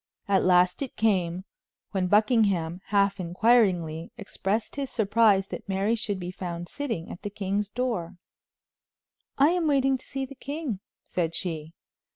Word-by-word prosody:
At 195 -2 +3
last 180 +2 +4
it 270 - -4
came, 185 -4 +1 0.5
when 190 -2 0
Buckingham, 200 -5 +2
half 200 -1 +2
inquiringly, 180 -4 +2
expressed 205 +1 -2
his 280 -2 -3
surprise 210 -2 +3
that - - -7
Mary 195 +3 +1
should 210 -3 -2
be 180 0 -5
found 175 -2 -5
sitting 230 - -4
at - - -9
the 205 - -4
king's 200 0 -2
door. 215 -8 -2 1.2
"I 280 +3 +6
am 345 -2 +1
waiting 270 -2 +3
to - - -14
see 270 -1 -4
the 270 - -11
king," 280 - -4 0.3
said 165 -2 -2
she. 160 -3 -4
200 Hz, 150 wpm, -27 LUFS, 180-235 Hz, 1.2 s, I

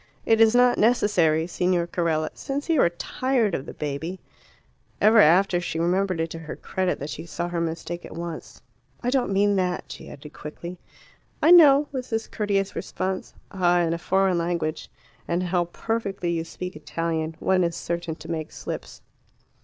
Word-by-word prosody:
"It 225 0 +4
is 225 +1 +6
not 245 0 +4
necessary, 185 -9 +3
Signor 180 0 0
Carella. 165 -3 -1
Since 285 +3 -5
you 320 -5 +4
are - - +4
tired 225 +5 -1
of 135 - -3
the - - -7
baby 150 +5 -4 0.4
" - - -39
Ever 215 +2 +6
after 180 0 +5
she 175 - -4
remembered 180 +1 +1
it 165 0 -1
to 165 - -6
her 160 -1 -7
credit 185 -1 -2
that 145 +2 -6
she 160 +3 -7
saw 175 +1 -3
her 170 -1 -2
mistake 165 +1 -4
at - - -10
once. 170 -1 -7 0.4
"I 245 - 0
don't 255 -6 +1
mean 200 +1 +3
that," 180 -1 -2
she - - -9
added 145 +1 -11
quickly. 170 +4 -8 0.6
"I 330 - +5
know," 295 -4 +8
was 260 -2 -5
his 225 0 -2
courteous 200 -2 -1
response. 190 0 -4 0.2
"Ah, 175 -2 +3
in 165 -1 +1
a 170 - -3
foreign 190 0 +2
language 170 -2 -2 0.4
(and 175 +1 0
how 175 -1 +1
perfectly 195 -1 -3
you 165 -1 -2
speak 180 +1 -7
Italian) 160 +1 -3
one 185 -1 +2
is 170 -1 -1
certain 170 -1 -3
to 160 - -12
make 160 -2 -4
slips." - - -7
175 Hz, 180 wpm, -25 LUFS, 165-205 Hz, 0.6 s, know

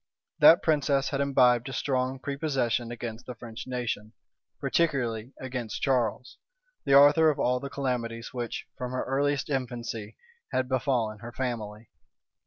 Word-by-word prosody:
That 165 - +8
princess 140 -3 +2
had 140 0 -1
imbibed 125 -3 +3
a - - -6
strong 130 -1 -1
prepossession 135 -4 -1
against 120 0 -6
the 125 - -6
French 115 +2 -9
nation, 120 -4 -3 0.5
particularly 125 -8 0
against 125 -3 -5
Charles, 125 -2 0 0.5
the 135 - +4
author 145 +3 +7
of 150 - 0
all 125 +1 +1
the 140 - -6
calamities 120 -4 -3
which, 120 -2 -4
from 125 0 -4
her 130 - -1
earliest 140 +2 0
infancy, 120 -5 -4 0.3
had 130 0 0
befallen 120 -5 0
her 120 +2 -8
family. 115 -4 -5
125 Hz, 140 wpm, -28 LUFS, 115-135 Hz, 0.5 s, That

